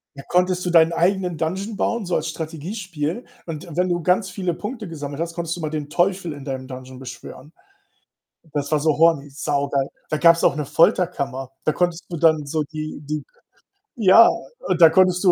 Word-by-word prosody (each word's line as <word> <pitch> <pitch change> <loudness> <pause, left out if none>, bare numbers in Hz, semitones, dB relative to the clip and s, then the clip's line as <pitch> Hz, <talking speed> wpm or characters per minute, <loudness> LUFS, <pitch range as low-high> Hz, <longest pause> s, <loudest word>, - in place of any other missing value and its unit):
Ja, 140 - -8
konntest 180 0 +1
du 180 - -1
deinen 165 -1 +5
eigenen 180 0 +1
dungeon 190 +7 -3
bauen, 230 +1 -1
so 180 - -1
als 155 - -1
Strategiespiel 165 - -5 0.2
und 160 -2 -6
wenn 180 +1 +1
du 175 -1 -1
ganz 185 +3 +2
viele 180 -1 -2
Punkte 215 +4 -6
gesammelt 145 -3 -6
hast, 170 0 -3
konntest 170 0 -3
du - - -7
mal 155 -1 -3
den 150 -2 -4
Teufel 175 +1 0
in 145 -2 -10
deinem 130 -2 -5
dungeon 130 0 -9
beschwören. 130 +3 -10 1.0
Das 145 0 -2
war 155 - +3
so 155 0 +1
horny, 160 -3 +3
saugeil. 140 -1 -1 0.2
Da - - 0
gab's 170 +1 +5
auch - - +5
eine 150 0 -3
Folterkammer. 140 -4 +1
Da 155 - +2
konntest 175 -1 -1
du 175 - -4
dann 155 -2 +3
so 155 +2 -1
die 155 0 -7
die 150 +1 -3 0.7
ja, 225 -1 +7 0.3
und 185 -2 -2
da 165 - +10
konntest 185 +1 +3
du 185 - +6
165 Hz, 190 wpm, -22 LUFS, 145-180 Hz, 1.0 s, da